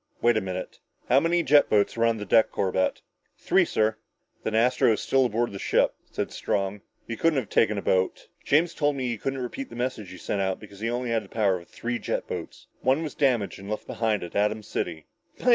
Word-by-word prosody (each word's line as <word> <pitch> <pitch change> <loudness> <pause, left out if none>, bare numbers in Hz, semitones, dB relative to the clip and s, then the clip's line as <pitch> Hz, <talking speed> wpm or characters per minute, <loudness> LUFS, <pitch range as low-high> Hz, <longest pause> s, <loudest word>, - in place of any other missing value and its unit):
"Wait 120 0 +4
a 110 - +2
minute! 95 -1 -5 0.3
How 130 - +6
many 170 +2 +2
jet 145 -2 +5
boats 105 -1 +2
were 115 0 +3
on 115 -1 +1
the 105 - -5
deck, 110 +3 +4
Corbett?" 95 -1 0 0.3
"Three, - - +3
sir." 110 0 +1 0.4
"Then 110 - -2
Astro 115 0 +4
is - - -2
still 135 -1 +3
aboard 120 +1 -1
the 100 - -7
ship," - - +2 0.2
said - - -3
Strong. 100 0 -2 0.3
"He 115 - -3
couldn't 165 +4 +2
have 125 -6 -2
taken 105 -2 +3
a 100 - -3
boat. 95 0 0 0.2
James 165 +4 +3
told 145 -1 +1
me 130 -2 -2
he 115 -3 -3
couldn't 135 +4 -2
repeat 195 - -5
the - - -10
message 120 -5 -3
he 95 - -9
sent 100 - -2
out 95 -1 -1
because 100 -2 -13
he 115 +2 -1
only 120 0 -2
had 115 -1 +1
the 95 - -15
power 100 -4 +2
of 85 - -16
three 120 0 -3
jet - - -2
boats. - - -7
One 135 +5 +2
was 155 - -4
damaged 125 -10 +1
and 100 +1 -9
left 110 - -3
behind 110 -3 -1
at 85 - -8
Atom 105 +1 +1
City!" 80 -6 -4
110 Hz, 230 wpm, -26 LUFS, 100-130 Hz, 0.4 s, How